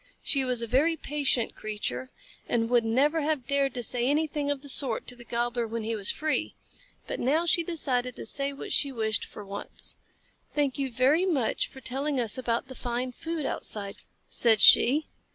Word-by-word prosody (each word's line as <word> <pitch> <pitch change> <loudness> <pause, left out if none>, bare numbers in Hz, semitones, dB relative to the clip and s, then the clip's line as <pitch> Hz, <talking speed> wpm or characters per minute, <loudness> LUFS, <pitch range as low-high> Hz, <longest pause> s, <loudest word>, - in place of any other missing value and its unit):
She 275 -3 +2
was 250 -2 0
a - - -1
very 285 +8 +2
patient 280 -6 0
creature, 130 -13 -4 0.4
and 230 0 0
would 240 -1 +4
never 280 +8 +2
have 295 -4 -1
dared 275 -1 0
say 245 +1 0
anything 295 0 0
of 285 -1 -2
the - - -8
sort 260 -4 +2
to 250 - -7
the 240 - -12
Gobbler 240 0 -2
when 225 0 -4
he 225 +1 -2
was 205 -2 -3
free, 310 0 -1 0.5
but - - -5
now 305 +7 +1
she 340 +1 +4
decided 260 -7 -1
to - - -7
say 275 +5 -1
what 280 - -8
she 280 - +2
wished 220 -4 -1
for 210 - -10
once. 200 +1 -3 0.6
"Thank 285 -2 0
you 270 -1 -1
very 280 +10 +3
much 275 -10 0
for 265 - -13
telling 270 +2 -1
us 230 -3 0
about 240 -1 -1
the 260 - -9
fine 245 0 -3
food 325 +2 -4
outside," 200 -2 -2 0.3
said 225 -3 +3
she. 290 +10 +7
255 Hz, 190 wpm, -27 LUFS, 235-290 Hz, 0.6 s, she